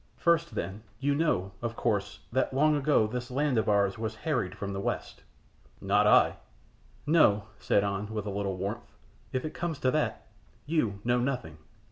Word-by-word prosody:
"First, 170 -1 +2
then, 100 +3 -4 0.2
you 140 +1 +1
know, 140 - +1
of 115 -1 -3
course, 105 -5 -1
that 130 +1 0
long 150 +2 +4
ago 145 -5 +3
this 125 +3 -4
land 135 -1 +1
of 110 - 0
ours 100 -1 +2
was 110 -1 -3
harried 125 - -1
from 100 -1 -4
the 95 - -3
West." 100 - -3 0.6
"Not - - +3
I." - - +5 0.7
"No!" 145 -10 +4 0.2
said 100 - +2
An, 100 +1 -2
with 105 -2 -3
a 105 - -3
little 100 -1 -2
warmth. 105 +6 -5 0.4
"If 130 +2 -2
it 155 - -4
comes 170 -4 -3
to 130 - +3
that, 155 +1 -1 0.4
you 115 -11 0
know 120 +1 +2
nothing." 120 - -3
115 Hz, 175 wpm, -29 LUFS, 100-145 Hz, 0.7 s, I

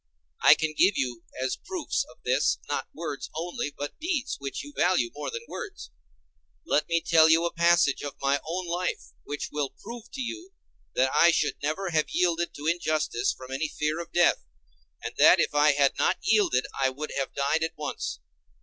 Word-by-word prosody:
I - - +8
can 155 -1 -2
give 190 +4 +4
you 120 -3 -2 0.2
as 130 - -1
proofs 365 -5 -2
of - - -19
this, - - +2
not - - -2
words - - -5
only, 170 -1 -3
but 145 0 -6
deeds, 315 -5 -1
which 140 0 -5
you 290 - -11
value 175 -10 +2
more 150 - -5
than 465 0 -6
words. 405 - -8 0.7
Let 150 - +1
me 170 0 +2
tell 160 -1 +5
you 165 +1 +5
a 170 - -2
passage 170 -3 +3
of 145 -2 -5
my 140 +1 +1
own 175 +3 -3
life, 175 +1 -3
which 145 0 -4
will 145 -2 -1
prove 235 +1 -9
to 265 - -4
you 345 +9 -6 0.4
that 130 +1 +3
I 170 - +6
should 155 -3 +1
never 155 +6 -2
have 155 -2 +1
yielded 175 -1 +1
to 145 - -8
injustice 155 -6 0
from 130 0 -10
any 140 +4 -1
fear 150 +2 -2
of 170 - -7
death, 175 0 +3 0.6
and - - -4
that - - +7
if - - +1
I 150 0 +5
had 140 -1 +3
not - - +2
yielded 190 -13 +3
I 135 - +1
should 150 +3 -6
have 135 - -3
died 140 +3 +1
at 160 - -3
once. 150 - -4
160 Hz, 195 wpm, -27 LUFS, 145-180 Hz, 0.7 s, I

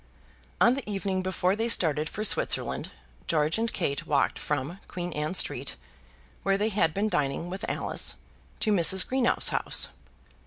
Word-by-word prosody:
On 235 - +5
the 265 -5 -5
evening 195 -2 -2
before 185 0 0
they 225 +2 -1
started 155 -7 +2
for 215 - -5
Switzerland, 215 - +1 0.4
George 155 +4 +1
and 230 0 -1
Kate 140 -6 -3
walked 145 -2 +1
from 150 +5 -3
Queen 175 -1 -5
Anne 150 +4 -3
Street, - - -1 0.7
where 195 0 +1
they 210 +2 0
had 190 -6 +1
been 200 +6 -1
dining 150 -1 -1
with 190 - -5
Alice, - - -1 0.5
to 215 - +2
Mrs. 190 0 +5
Greenow's 260 -2 +3
house. - - +1
185 Hz, 155 wpm, -27 LUFS, 155-210 Hz, 0.7 s, On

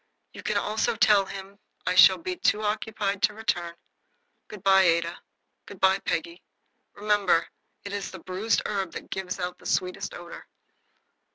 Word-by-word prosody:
"You - - -9
can - - -1
also 220 +2 0
tell 210 -4 +4
him 195 +1 -9 0.3
I 180 - +1
shall 185 0 +8
be 180 +1 -4
too 210 +4 +1
occupied 210 -1 -2
to 210 - +2
return. 175 -6 -2 0.7
Good 210 -2 -11
bye, 195 -1 +6
Ada. 170 -1 +1 0.5
Good 200 - -11
bye, 190 +1 +4
Peggy. 170 0 -3 0.5
Remember, 205 -5 +2 0.4
it 200 - -6
is 205 -1 -3
the - - -9
bruised 195 +4 -1
herb 195 -4 -2
that - - -9
gives 190 0 -4
out 180 0 -4
the - - -9
sweetest 180 0 -2
odor." 175 -1 -10
195 Hz, 160 wpm, -26 LUFS, 180-210 Hz, 0.7 s, shall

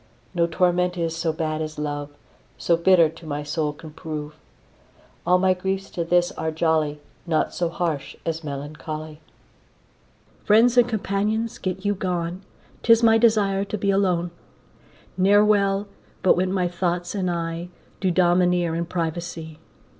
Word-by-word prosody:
No 170 -2 +2
torment 180 +1 +1
is 165 -1 -1
so 165 -1 0
bad 155 0 -2
as 155 0 -5
love, 145 -1 -3 0.5
So 170 - +2
bitter 170 0 +5
to 165 +2 -12
my 145 0 -3
soul 150 0 -1
can 155 +1 -12
prove. 150 -1 -6 0.9
All 180 - +5
my 185 0 +3
griefs 190 +1 -3
to 170 - -2
this 175 +1 +2
are 160 0 -3
jolly, 155 -2 0 0.3
Naught 160 -2 +1
so 175 -1 -1
harsh 165 -5 -3
as 165 0 -2
melancholy. 155 +2 -6 1.2
Friends 230 +4 +5
and 245 -1 +5
companions 220 +2 -1
get 185 +1 -4
you 205 - +2
gone, 180 -1 -3 0.4
'Tis 230 0 +5
my 225 0 +6
desire 205 -4 +3
to 210 - -4
be 200 0 +1
alone; 180 -3 +1 0.9
Ne'er 205 +3 +5
well 200 -1 +2 0.4
but 185 - +5
when 185 +1 0
my 185 -2 +1
thoughts 175 0 -2
and 190 -3 -1
I 170 0 -3 0.3
Do 190 - +1
domineer 175 -1 +3
in 170 +1 -2
privacy. 165 -2 -4
175 Hz, 150 wpm, -23 LUFS, 160-190 Hz, 1.2 s, my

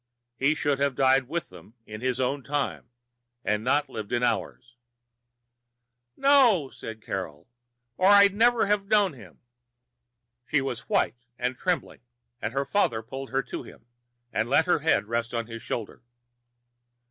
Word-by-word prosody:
He 140 +5 +2
should 145 -3 0
have 140 -2 +1
died 130 -1 +3
with 170 +4 -3
them 110 - -15
in 110 +1 -9
his 130 0 -1
own 135 +2 0
time 140 -4 -3 0.6
and 105 +1 0
not 145 +4 +2
lived 110 -6 -7
into 125 0 +1
ours." 120 0 -3 1.4
"No," 245 - +4
said 110 -1 -9
Carol, 90 -7 -5 0.5
"or 185 - +3
I'd 200 -1 +7
never 235 +2 +4
have 200 -1 0
known 205 -4 +3
him." 125 - -15 1.1
She 150 - +3
was 135 -3 -5
white 120 0 0
and 125 +1 -2
trembling, - - -2 0.4
and 105 - -2
her 135 +2 -1
father 120 - +1
pulled 135 +4 -7
her 135 +1 0
to - - -6
him - - -14 0.5
and 110 +2 0
let 155 +4 +4
her 175 - +2
head 160 -6 +2
rest 115 +2 -2
on 115 -1 -1
his 115 0 -8
shoulder. 110 -1 -5
135 Hz, 155 wpm, -26 LUFS, 115-160 Hz, 1.4 s, I'd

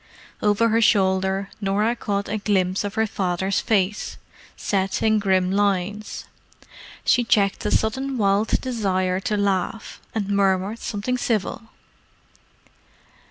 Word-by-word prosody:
Over 210 +2 +3
her 225 +1 +2
shoulder 190 -2 +2
Norah 210 +4 +1
caught 200 -3 -2
a 215 +1 -2
glimpse 190 -2 +1
of 205 0 -4
her 220 - +2
father's 190 -1 -1
face, 210 -2 0 0.4
set 195 -1 -1
in 220 -1 +3
grim 190 -2 +2
lines. 205 +1 -1 0.8
She 245 - +4
checked 200 -4 +2
a - - +1
sudden 265 +5 0
wild 200 0 +2
desire 190 -7 0
to 210 +1 -1
laugh, 200 +1 -2
and 205 -3 -2
murmured 200 +2 +1
something 235 +5 -2
civil. 225 -1 -2
200 Hz, 120 wpm, -23 LUFS, 190-220 Hz, 0.8 s, She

